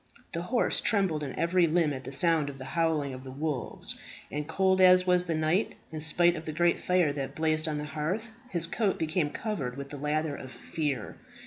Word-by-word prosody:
The 170 - -3
horse 235 +8 +1
trembled 190 -8 +2
in 140 -3 -5
every 170 +1 +3
limb 160 -2 +2
at 130 -1 -7
the - - -6
sound 160 -1 +3
of 140 - -8
the 130 - -8
howling 160 -5 +1
of 130 0 -8
the 135 - -8
wolves; 140 -1 -3 0.3
and 150 0 -3
cold 190 +2 +2
as 185 0 +7
was 180 -1 +3
the 165 -2 -1
night, 160 +6 +1 0.2
in 155 - -5
spite 170 +3 +3
of 160 0 -7
the 155 - -3
great 170 +2 +2
fire 180 -5 +2
that 140 -2 -4
blazed 155 0 +1
on 150 -1 -1
the 150 - -3
hearth, 160 +10 -3 0.2
his 170 -5 0
coat 200 +3 0
became 160 -1 0
covered 145 - -4
with 140 0 -7
the 145 - -6
lather 150 +1 -1
of 130 - -8
fear. 130 0 -3
155 Hz, 215 wpm, -29 LUFS, 145-175 Hz, 0.3 s, as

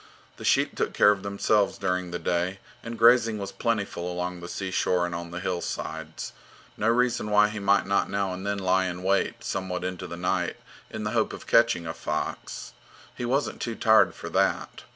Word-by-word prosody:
The - - -9
sheep - - +3
took - - -1
care 105 - +6
of 100 -2 -1
themselves 100 +1 +1
during 90 0 -1
the 85 - -3
day, 90 +2 -1 0.2
and 115 0 -6
grazing 115 -1 +5
was 100 -1 -5
plentiful 100 -6 -2
along 90 0 -3
the 85 0 -8
seashore 90 -1 0
and 85 - -4
on 85 0 -5
the 85 +1 -5
hillsides. 80 -3 -4 0.4
No 105 - -1
reason 120 -2 +1
why 105 0 +5
he 105 0 -5
might 100 0 +3
not 100 +1 +1
now 100 -2 -1
and 90 +1 -6
then 100 0 -1
lie 95 -1 +2
in 90 0 -5
wait 100 +1 +1
somewhat 90 -1 -3
into 90 0 -4
the 85 - -7
night 90 0 -1 0.3
in - - -5
the - - -2
hope - - +1
of - - -9
catching 115 -8 +3
a 80 - -3
fox; - - -4 0.4
he 120 - -4
wasn't 135 +4 -1
too 115 -2 -2
tired 110 0 +4
for - - -7
that. - - 0
95 Hz, 195 wpm, -26 LUFS, 90-105 Hz, 0.4 s, care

